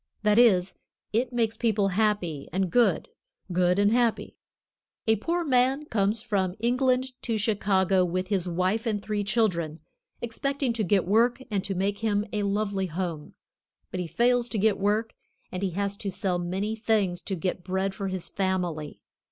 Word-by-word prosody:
That 210 +1 +4
is, 190 -6 +4 0.4
it 240 +3 +1
makes 230 -2 0
people 210 -4 +1
happy 190 -7 0
and 185 0 0
good, 240 - +3 0.4
good 180 +1 +2
and 205 +1 +4
happy. 235 -1 +1 0.7
A 220 -1 +3
poor 340 - -1
man 265 0 +2
comes 210 -3 0
from 190 -6 0
England 255 +2 +1
to 230 -3 -1
Chicago 195 -3 +2
with 185 +1 -2
his 190 -4 0
wife 185 +6 0
and 215 -2 0
three 210 0 -2
children, 180 -7 0 0.4
expecting 265 +2 -1
to 225 -2 -1
get 195 0 +2
work 235 +6 +2
and 195 -2 0
to 195 -1 -2
make 200 +2 -1
him 210 -2 0
a 210 - 0
lovely 200 -1 0
home. 165 -3 -4 0.6
But 185 - -3
he 180 - -2
fails 240 +5 +2
to 225 - -2
get 210 0 +2
work 210 +3 0 0.4
and 180 - -4
he 195 - 0
has 200 0 -1
to 205 -2 -4
sell 185 -1 -1
many 190 +5 -2
things 215 -5 0
to 195 - -4
get 180 +1 -3
bread 190 +1 -1
for 195 0 -4
his 185 -2 -4
family. 180 -6 -2
205 Hz, 170 wpm, -27 LUFS, 185-225 Hz, 0.7 s, That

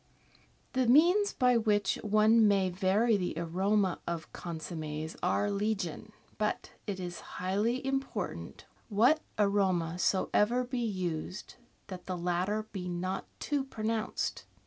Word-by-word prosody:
The 260 -2 +2
means 350 - +5
by 250 -1 +3
which 210 -3 +1
one 215 +1 +5
may 195 -2 +3
vary 200 +5 +2
the 180 -4 -2
aroma 185 +3 +1
of 170 -1 -4
con 170 -2 -6
sommes 155 -1 -5
are 205 +3 +1
legion, 200 -4 -2 0.3
but 210 0 -1 0.2
it 195 -2 -3
is 175 -1 -5 0.2
highly 210 +8 0
important, 270 0 -3 0.2
what 235 +9 +4 0.2
aroma 190 -5 +1
soever 210 +6 +2
be 250 0 -3
used, 185 -5 -3 0.3
that 185 -2 -9
the 185 -1 -2
latter 180 +5 0
be 180 -3 -5
not 180 +2 -3
too 290 -2 -1
pronounced. 225 -3 -2
200 Hz, 125 wpm, -31 LUFS, 180-225 Hz, 0.3 s, means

